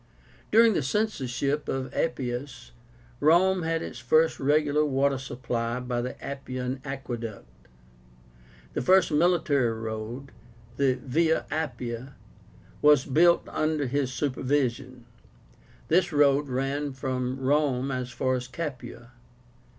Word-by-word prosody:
During 225 Hz, +1 st, +6 dB
the 165 Hz, -, +1 dB
censorship 140 Hz, -, -1 dB
of 135 Hz, 0 st, -3 dB
Appius, 125 Hz, -4 st, -3 dB, 0.5 s
Rome 180 Hz, +5 st, +4 dB
had 165 Hz, 0 st, -1 dB
its 120 Hz, -, -7 dB
first 155 Hz, +7 st, +2 dB
regular 150 Hz, +1 st, +2 dB
water 140 Hz, -1 st, +1 dB
supply 120 Hz, -2 st, -3 dB
by 125 Hz, -1 st, -2 dB
the 125 Hz, +1 st, -6 dB
Appian 130 Hz, -1 st, -5 dB
aqueduct. 120 Hz, -, -6 dB, 1.3 s
The -, -, -1 dB
first 185 Hz, +4 st, +4 dB
military 150 Hz, -6 st, +2 dB
road, 110 Hz, +4 st, -6 dB, 0.5 s
the 135 Hz, -2 st, +2 dB
VIA 160 Hz, +5 st, +1 dB
APPIA, 130 Hz, -5 st, -4 dB, 0.7 s
was 150 Hz, -3 st, +5 dB
built 170 Hz, +5 st, +4 dB
under 155 Hz, -2 st, 0 dB
his 135 Hz, 0 st, -1 dB
supervision. 130 Hz, -2 st, -1 dB, 0.8 s
This 175 Hz, +2 st, +2 dB
road 145 Hz, -1 st, +3 dB
ran 135 Hz, +2 st, -1 dB
at 145 Hz, 0 st, -2 dB
first 130 Hz, -, -19 dB
from 130 Hz, -1 st, -2 dB
Rome 135 Hz, -1 st, +1 dB
as 130 Hz, -1 st, -3 dB
far 130 Hz, 0 st, -1 dB
as 125 Hz, -1 st, -3 dB
Capua. 120 Hz, -4 st, -7 dB
135 Hz, 120 wpm, -27 LUFS, 125-150 Hz, 1.3 s, During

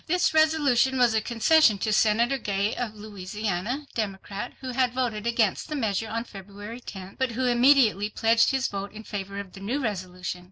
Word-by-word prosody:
This 355 Hz, 0 st, +2 dB
resolution 290 Hz, -5 st, +3 dB
was 245 Hz, -3 st, +4 dB
a 220 Hz, -, +2 dB
concession 235 Hz, +1 st, +4 dB
to 215 Hz, +2 st, -1 dB
Senator 235 Hz, +5 st, +3 dB
Gay 200 Hz, -1 st, -1 dB
of 230 Hz, -3 st, -4 dB
Louisiana, 210 Hz, +4 st, -4 dB
Democrat, 205 Hz, 0 st, -4 dB
who 260 Hz, -1 st, -4 dB
had 250 Hz, -1 st, 0 dB
voted 235 Hz, -4 st, -1 dB
against 230 Hz, -, +1 dB
the 305 Hz, -, -3 dB
measure 220 Hz, -4 st, -1 dB
on 230 Hz, +1 st, -2 dB
February 205 Hz, +2 st, -10 dB
10th, 190 Hz, -2 st, -10 dB
but 260 Hz, -3 st, 0 dB
who 255 Hz, +3 st, -1 dB
immediately 240 Hz, -4 st, +4 dB
pledged 225 Hz, +2 st, +3 dB
his 265 Hz, -1 st, 0 dB
vote 200 Hz, 0 st, -5 dB
in 215 Hz, +1 st, -9 dB
favor 200 Hz, -2 st, -5 dB
of 195 Hz, -2 st, -8 dB
the -, -, -10 dB
new 225 Hz, +9 st, -2 dB
resolution. 185 Hz, -6 st, -4 dB
220 Hz, 185 wpm, -26 LUFS, 200-250 Hz, -, was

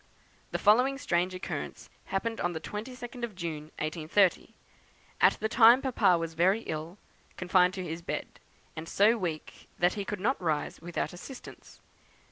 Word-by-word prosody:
"The -, -, -2 dB
following 250 Hz, +6 st, +4 dB
strange 185 Hz, -9 st, 0 dB
occurrence 180 Hz, -, -6 dB, 0.2 s
happened 225 Hz, +4 st, -2 dB
on 175 Hz, -, 0 dB
the 160 Hz, -, -4 dB
22nd 240 Hz, +6 st, -7 dB
of 225 Hz, -4 st, -4 dB
June, 165 Hz, -4 st, -5 dB
1830: 165 Hz, +4 st, +1 dB, 0.7 s
At -, -, +7 dB
the 220 Hz, -, -2 dB
time 235 Hz, +2 st, +7 dB
Papa 240 Hz, -9 st, +3 dB
was 165 Hz, -1 st, -4 dB
very 190 Hz, +7 st, +3 dB
ill, 160 Hz, 0 st, -5 dB, 0.4 s
confined 180 Hz, 0 st, +3 dB
to 185 Hz, -, -4 dB
his 165 Hz, 0 st, -5 dB
bed, -, -, -5 dB, 0.4 s
and 160 Hz, +1 st, -7 dB
so 210 Hz, +4 st, +4 dB
weak 170 Hz, -8 st, -5 dB
that 175 Hz, +1 st, +3 dB
he 205 Hz, -, -3 dB
could 205 Hz, 0 st, -4 dB
not 235 Hz, +6 st, 0 dB
rise 155 Hz, -4 st, -1 dB
without 175 Hz, +2 st, -3 dB
assistance. 245 Hz, +9 st, -11 dB
185 Hz, 155 wpm, -29 LUFS, 170-225 Hz, 0.7 s, At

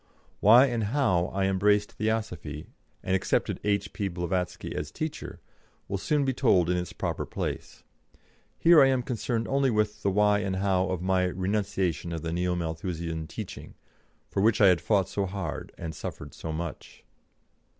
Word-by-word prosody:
Why 120 Hz, +6 st, +8 dB
and 120 Hz, -5 st, -1 dB
how 100 Hz, -8 st, +2 dB
I 95 Hz, 0 st, -1 dB
embraced 105 Hz, +2 st, +2 dB
Theosophy, 90 Hz, -9 st, -3 dB, 0.4 s
and 95 Hz, -, +1 dB
accepted 95 Hz, -, 0 dB
H.P. 100 Hz, 0 st, -1 dB
Blavatsky 90 Hz, 0 st, -3 dB
as 75 Hz, -, -3 dB
teacher, 155 Hz, -, -5 dB, 0.5 s
will 100 Hz, -, -2 dB
soon 145 Hz, +6 st, +1 dB
be 135 Hz, -, +1 dB
told 95 Hz, -10 st, +3 dB
in 90 Hz, -, +1 dB
its 90 Hz, -1 st, -3 dB
proper -, -, -3 dB
place. -, -, -5 dB, 0.7 s
Here 165 Hz, -2 st, +7 dB
I 135 Hz, -, +7 dB
am 130 Hz, -2 st, +1 dB
concerned 115 Hz, -2 st, -2 dB
only 135 Hz, 0 st, +2 dB
with 105 Hz, -2 st, 0 dB
the 100 Hz, -, +1 dB
why 105 Hz, +1 st, +3 dB
and 95 Hz, -2 st, -2 dB
how 95 Hz, -1 st, +1 dB
of 90 Hz, -1 st, -2 dB
my 95 Hz, 0 st, +2 dB
renunciation 95 Hz, -3 st, -1 dB
of 80 Hz, -, -5 dB
the 80 Hz, 0 st, -3 dB
Neo 90 Hz, +1 st, 0 dB
Malthusian 80 Hz, -1 st, -4 dB
teaching, 105 Hz, +3 st, -8 dB, 0.5 s
for 95 Hz, -, -1 dB
which 110 Hz, +1 st, +3 dB
I 100 Hz, -, +7 dB
had 90 Hz, -2 st, +3 dB
fought 100 Hz, -4 st, +2 dB
so 100 Hz, 0 st, -2 dB
hard 95 Hz, +1 st, -5 dB
and 80 Hz, -2 st, -5 dB
suffered 75 Hz, -1 st, -7 dB
so 80 Hz, -, -6 dB
much. 80 Hz, -1 st, -6 dB
95 Hz, 165 wpm, -27 LUFS, 90-110 Hz, 0.7 s, Why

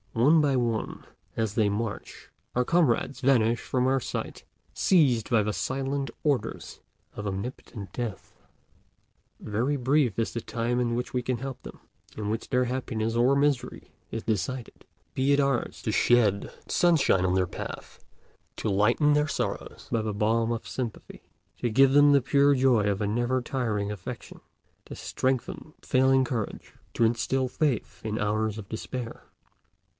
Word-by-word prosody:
One 145 Hz, +8 st, +5 dB
by 140 Hz, -2 st, +2 dB
one, 115 Hz, -3 st, -2 dB, 0.3 s
as 110 Hz, -3 st, 0 dB
they 110 Hz, -2 st, +2 dB
march, 105 Hz, +1 st, -5 dB, 0.2 s
our 125 Hz, 0 st, +1 dB
comrades 140 Hz, -4 st, +1 dB
vanish 120 Hz, -4 st, +3 dB
from 125 Hz, -1 st, 0 dB
our 135 Hz, 0 st, +2 dB
sight, -, -, -5 dB, 0.3 s
seized 135 Hz, -, +3 dB
by 115 Hz, -3 st, +4 dB
the 105 Hz, 0 st, -1 dB
silent 135 Hz, +2 st, -2 dB
orders 140 Hz, -7 st, -2 dB, 0.3 s
of 105 Hz, -, -6 dB
omnipotent 100 Hz, -1 st, -6 dB
Death. 115 Hz, -6 st, -5 dB, 1.1 s
Very 120 Hz, +7 st, -1 dB
brief 130 Hz, -4 st, +1 dB
is 115 Hz, -, -1 dB
the 115 Hz, -, -3 dB
time 120 Hz, +2 st, -1 dB
in 120 Hz, -1 st, 0 dB
which 125 Hz, +1 st, -4 dB
we 125 Hz, -, 0 dB
can 125 Hz, 0 st, -2 dB
help 130 Hz, +1 st, -6 dB
them, -, -, -11 dB, 0.4 s
in 105 Hz, -1 st, -3 dB
which 110 Hz, +1 st, -3 dB
their 125 Hz, -1 st, +2 dB
happiness 115 Hz, -3 st, -2 dB
or 125 Hz, +4 st, +4 dB
misery 140 Hz, -3 st, 0 dB, 0.2 s
is 115 Hz, -, -5 dB
decided. 115 Hz, +4 st, -3 dB, 0.3 s
Be 135 Hz, +2 st, +1 dB
it 140 Hz, -, +3 dB
ours 140 Hz, -3 st, 0 dB
to -, -, -1 dB
shed 105 Hz, -5 st, +3 dB, 0.2 s
sunshine 160 Hz, -, +3 dB
on 90 Hz, 0 st, +1 dB
their 95 Hz, -1 st, +2 dB
path, -, -, -8 dB, 0.5 s
to -, -, -2 dB
lighten 115 Hz, +9 st, +3 dB
their 150 Hz, +1 st, +2 dB
sorrows -, -, -4 dB
by 115 Hz, -, +1 dB
the 110 Hz, -1 st, -3 dB
balm 115 Hz, +2 st, +1 dB
of 115 Hz, -1 st, -4 dB
sympathy, 120 Hz, -4 st, -6 dB, 0.4 s
to 120 Hz, -, 0 dB
give 135 Hz, +4 st, +5 dB
them 145 Hz, 0 st, +7 dB
the 140 Hz, -1 st, +5 dB
pure 140 Hz, +2 st, +4 dB
joy 125 Hz, -5 st, +3 dB
of 100 Hz, 0 st, -1 dB
a 105 Hz, -, 0 dB
never 120 Hz, +4 st, 0 dB
tiring 110 Hz, -6 st, -2 dB
affection, 105 Hz, -4 st, -8 dB, 0.5 s
to -, -, -8 dB
strengthen 130 Hz, +4 st, -2 dB
failing 130 Hz, 0 st, +3 dB
courage, 115 Hz, -4 st, -4 dB, 0.2 s
to 115 Hz, -, +3 dB
instil 120 Hz, +3 st, +1 dB
faith 135 Hz, -2 st, -1 dB
in 110 Hz, 0 st, -2 dB
hours 110 Hz, +1 st, 0 dB
of 105 Hz, -3 st, -8 dB
despair. 115 Hz, +2 st, -6 dB
120 Hz, 160 wpm, -27 LUFS, 110-135 Hz, 1.1 s, them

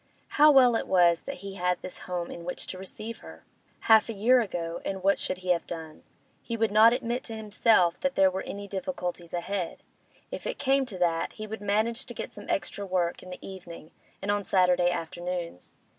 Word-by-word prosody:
How 300 Hz, +1 st, +6 dB
well 255 Hz, -5 st, +6 dB
it -, -, -1 dB
was 175 Hz, -2 st, +4 dB
that 275 Hz, -, -6 dB
he 195 Hz, -, -5 dB
had 180 Hz, -1 st, 0 dB
this 185 Hz, -, -7 dB
home 175 Hz, -1 st, -3 dB
in 170 Hz, -, -8 dB
which 180 Hz, -, -4 dB
to 185 Hz, -, -7 dB
receive 215 Hz, +4 st, -7 dB
her! 80 Hz, 0 st, -13 dB, 0.4 s
Half 220 Hz, 0 st, +5 dB
a -, -, -2 dB
year 240 Hz, +5 st, +4 dB
ago, 170 Hz, -5 st, -4 dB
and 190 Hz, -1 st, -4 dB
what 195 Hz, +1 st, +3 dB
should 185 Hz, -, -2 dB
he -, -, -3 dB
have 175 Hz, -1 st, +2 dB
done? 160 Hz, -2 st, -7 dB, 0.4 s
He 230 Hz, -, -4 dB
would 225 Hz, -2 st, +1 dB
not 220 Hz, +2 st, +7 dB
admit 240 Hz, 0 st, -2 dB
to 225 Hz, -, -6 dB
himself 210 Hz, -4 st, +2 dB
that 275 Hz, -1 st, -1 dB
there 190 Hz, -1 st, +5 dB
were 190 Hz, +1 st, -3 dB
any 200 Hz, 0 st, -7 dB
difficulties 180 Hz, -5 st, -4 dB
ahead; 180 Hz, 0 st, -3 dB, 0.5 s
if -, -, -5 dB
it -, -, -3 dB
came 270 Hz, 0 st, +2 dB
to 200 Hz, -6 st, -7 dB
that, 170 Hz, -2 st, 0 dB
he 215 Hz, -, -7 dB
would 215 Hz, 0 st, -7 dB
manage 215 Hz, +3 st, 0 dB
to 240 Hz, -, -8 dB
get -, -, -6 dB
some 205 Hz, -, -10 dB
extra 195 Hz, +2 st, -2 dB
work 180 Hz, -3 st, -1 dB
in 185 Hz, -, -11 dB
the 180 Hz, -, -9 dB
evening 175 Hz, -4 st, -10 dB, 0.3 s
and 200 Hz, -, +1 dB
on 205 Hz, 0 st, 0 dB
Saturday 180 Hz, -2 st, +3 dB
afternoons. 175 Hz, -, -5 dB
190 Hz, 210 wpm, -28 LUFS, 175-220 Hz, 0.5 s, not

